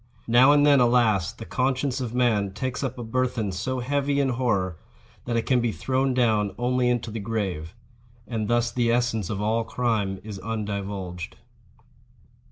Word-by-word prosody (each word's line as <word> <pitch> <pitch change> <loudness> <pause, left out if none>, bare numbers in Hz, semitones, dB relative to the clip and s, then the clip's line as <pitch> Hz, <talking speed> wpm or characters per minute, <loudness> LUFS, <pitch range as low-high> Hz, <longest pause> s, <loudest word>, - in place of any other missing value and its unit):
Now 120 +4 +6
and 145 0 +5
then, 145 -2 +6
alas, 120 -7 +3
the 115 - -10
conscience 130 +1 -1
of 120 -3 -3
man 110 -6 +1
takes 130 +6 -3
up 130 -2 -3
a 120 - -5
burthen 115 -3 -1
so 125 +8 -3
heavy 140 +2 0
in 140 -1 +2
horror 105 -9 0 0.5
that 120 -1 -1
it 115 - -1
can 125 -2 +2
be 120 -1 0
thrown 130 +8 0
down 110 -5 +2
only 125 0 +1
into 120 -2 -1
the 110 - -4
grave. 100 -5 -3 0.5
And 110 -3 -2
thus 120 +1 +1
the 120 -1 +1
essence 115 -5 0
of 105 -1 -2
all 115 +2 +1
crime 110 -6 -1
is 105 -2 -7
undivulged. 100 -5 -4
115 Hz, 170 wpm, -25 LUFS, 105-125 Hz, 0.5 s, Now